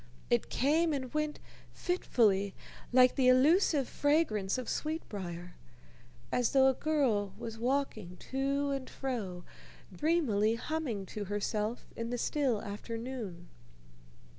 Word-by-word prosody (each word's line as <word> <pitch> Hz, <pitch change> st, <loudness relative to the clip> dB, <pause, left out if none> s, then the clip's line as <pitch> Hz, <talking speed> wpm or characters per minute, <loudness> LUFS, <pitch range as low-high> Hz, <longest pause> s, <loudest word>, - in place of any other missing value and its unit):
It 120 Hz, -, +2 dB
came 315 Hz, +5 st, +2 dB
and 260 Hz, -3 st, -4 dB
went 305 Hz, 0 st, -1 dB, 0.3 s
fitfully, 210 Hz, -, +1 dB, 0.4 s
like 255 Hz, 0 st, +6 dB
the 260 Hz, -2 st, +2 dB
elusive 280 Hz, +2 st, +4 dB
fragrance 275 Hz, -10 st, +1 dB
of 255 Hz, -, -4 dB
sweetbrier 185 Hz, -, -4 dB, 0.8 s
as 245 Hz, -2 st, +1 dB
though 265 Hz, -1 st, +6 dB
a 265 Hz, -, +5 dB
girl 240 Hz, -10 st, 0 dB
was 225 Hz, -1 st, -6 dB
walking 235 Hz, -8 st, -1 dB
to 275 Hz, +1 st, 0 dB
and 270 Hz, -2 st, -3 dB
fro, 210 Hz, -10 st, -4 dB, 0.5 s
dreamily 240 Hz, -10 st, +2 dB
humming 245 Hz, -6 st, -3 dB
to 205 Hz, +2 st, -5 dB
herself 210 Hz, +3 st, -2 dB
in 230 Hz, 0 st, -4 dB
the 245 Hz, -, -2 dB
still 255 Hz, -4 st, 0 dB
afternoon. 220 Hz, -4 st, -6 dB
245 Hz, 115 wpm, -32 LUFS, 205-280 Hz, 0.8 s, like